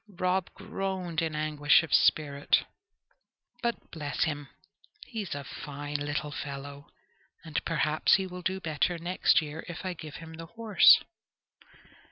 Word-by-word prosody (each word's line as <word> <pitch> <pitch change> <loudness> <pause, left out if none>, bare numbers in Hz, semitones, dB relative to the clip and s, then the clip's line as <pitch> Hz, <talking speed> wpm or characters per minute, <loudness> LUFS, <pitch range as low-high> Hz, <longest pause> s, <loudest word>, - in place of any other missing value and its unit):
Rob 185 0 +1
groaned 185 -4 -3
in 160 -2 -2
anguish 150 0 +3
of 160 - -5
spirit. 145 -2 +3 1.0
"But, 235 0 -3
bless 150 -3 -2
him! 145 -3 -2 0.6
he's 215 - -5
a 140 - -5
fine 145 +2 -5
little 145 0 -2
fellow, 140 0 -7 0.6
and 155 -2 -2
perhaps 155 -1 +3
he 190 - 0
will 180 -1 -7
do 190 +2 -1
better 165 +1 0
next 175 0 +2
year 155 +1 -6
if 175 +2 -7
I 185 - -1
give 155 -3 -9
him 165 0 -9
the 165 0 -8
horse." 225 +1 +6
160 Hz, 140 wpm, -29 LUFS, 145-180 Hz, 1.0 s, horse